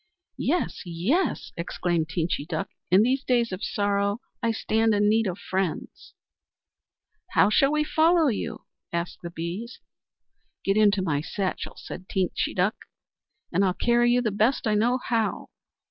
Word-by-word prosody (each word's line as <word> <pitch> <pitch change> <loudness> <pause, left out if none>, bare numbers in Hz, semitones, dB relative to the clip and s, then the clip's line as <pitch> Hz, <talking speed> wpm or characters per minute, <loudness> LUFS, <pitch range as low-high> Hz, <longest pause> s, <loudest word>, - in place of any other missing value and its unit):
"Yes, 340 +6 0
yes!" 195 - -1
exclaimed 170 -1 -1
Teenchy 165 -3 -2
Duck. 195 - -3 0.2
"In 185 +4 +6
these 260 +3 +1
days 240 -3 +1
of 185 +1 -5
sorrow 200 0 0 0.2
I 230 - +1
stand 225 0 +1
in 205 0 +3
need 220 0 +3
of 185 -1 -3
friends." 190 -4 -4 1.2
"How 210 - +5
shall 275 +6 +4
we 300 0 +2
follow 320 +1 +3
you?" 225 -2 -3 0.3
asked 170 +1 -3
the 170 - -6
Bees. 175 +9 -6 0.9
"Get 195 - +2
into 205 -2 +4
my 145 -5 0
satchel," 185 +4 -3
said 185 - -9
Teenchy 185 -2 -1
Duck. 195 +5 +1 0.8
"I'll 185 +1 +2
carry 240 +1 +3
you 245 0 +3
the 220 - 0
best 220 +6 +1
I 215 - +2
know 235 +4 +2
how." 225 -2 -1
205 Hz, 145 wpm, -26 LUFS, 185-235 Hz, 1.2 s, In